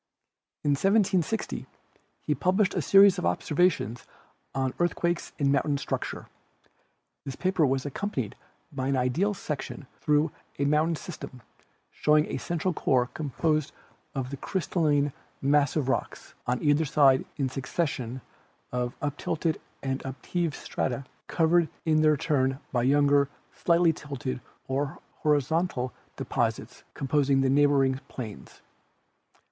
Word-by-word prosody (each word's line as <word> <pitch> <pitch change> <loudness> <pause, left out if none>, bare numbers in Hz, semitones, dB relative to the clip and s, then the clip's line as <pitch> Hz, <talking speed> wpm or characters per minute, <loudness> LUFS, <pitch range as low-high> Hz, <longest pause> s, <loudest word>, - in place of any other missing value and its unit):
In 145 - +2
1760 195 +4 +1 0.6
he 150 - +1
published 185 +5 +2
a - - 0
series 195 -1 +6
of - - -2
observations 150 - +1 0.5
on 130 -1 0
earth 175 0 +2
quakes 170 0 -1
and 140 -2 +2
mountain 140 +1 +2
structure. - - -4 1.0
This 135 - -6
paper 185 -5 +2
was 135 +1 0
accom 200 +9 -3
panied 120 - -3 0.4
by 130 -2 -2
an 135 -1 +1
ideal 160 +12 +1
section 150 -3 -5
through 150 +1 +2 0.3
a 140 - 0
mountain 155 +3 +2
system, 140 -7 -9 0.5
showing 150 0 +3
a - - -1
central 175 +1 -1
core 125 -5 +1
composed 155 +1 -1 0.4
of 130 -1 -3
the 140 - -4
crystalline 150 -5 0 0.3
massive 145 0 +2
rocks, 135 - -2
on 125 0 0
either 145 +1 +4
side 135 -3 +4
a 135 - +1
succession 130 -2 -3 0.5
of 125 0 -2
uptilted 155 +2 -1 0.2
and 135 0 -2
upheaved 145 +5 -2
strata 130 +1 -3 0.2
covered 165 0 +3 0.2
in 155 -1 +3
their 155 -1 +4
turn 135 -3 +1
by 120 - +1
younger, 140 +2 +4 0.2
slightly 170 -1 +3
tilted 135 -4 -5 0.3
or 140 +5 -1 0.2
horizontal 150 -2 +1 0.2
deposits - - -2
composing 140 0 +2
the 135 -1 +2
neighboring 135 -2 +3
plains. 110 -5 -8
145 Hz, 125 wpm, -27 LUFS, 135-165 Hz, 1.0 s, series